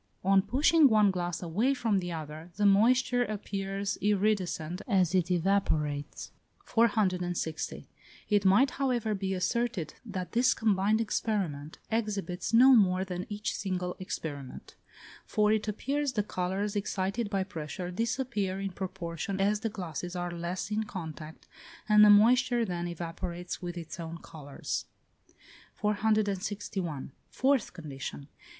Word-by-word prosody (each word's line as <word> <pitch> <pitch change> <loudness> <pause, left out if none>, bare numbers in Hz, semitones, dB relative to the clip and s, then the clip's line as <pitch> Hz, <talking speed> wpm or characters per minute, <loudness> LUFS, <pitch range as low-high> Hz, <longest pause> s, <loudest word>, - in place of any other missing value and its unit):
On 195 +1 +5
pushing 290 - +4
one 210 -3 +5
glass 175 -2 -3
away 215 +11 +1
from 225 -6 +1
the 175 -1 -4
other 155 +1 -7
the 205 +1 +1
moisture 245 +5 +4
appears 200 -2 -3
iridescent 190 -4 0
as 190 -6 +2
it 180 -1 +2
evaporates. 160 -6 0 0.3
460. 185 -8 0 0.4
It 205 -2 +3
might, 205 +8 +5
however, 240 -5 +1
be 190 -1 -2
asserted 190 - -1
that 185 -6 -5
this 245 +2 +3
combined 215 0 +2
experiment 185 -9 -2
exhibits 200 -5 -2
no 255 +3 +8
more 190 -4 +3
than 180 -1 -5
each 210 +1 -3
single 180 -2 -3
experiment; 145 -7 -6 0.5
for 210 0 +2
it 220 0 -1
appears 275 +6 -1
the 210 -3 +1
colours 195 +2 -2
excited 200 +2 -1
by 195 -2 0
pressure 175 -1 -6
disappear 215 -2 -1
in 195 0 -3
proportion 185 0 -4
as 205 +2 +2
the 225 +1 -2
glasses 180 -3 -5
are 175 0 -3
less 175 +4 -4
in 215 +1 0
contact, 160 -5 -8 0.4
and 210 -1 +7
the 210 - +8
moisture 240 +3 +5
then 175 -3 -3
evaporates 175 +1 -5
with 175 -1 -5
its 170 0 -7
own 165 0 -5
colours. 145 -4 -5 0.9
461. 205 - -1 0.2
Fourth 270 -3 +1
condition. 140 -3 -7
195 Hz, 130 wpm, -30 LUFS, 175-215 Hz, 0.9 s, no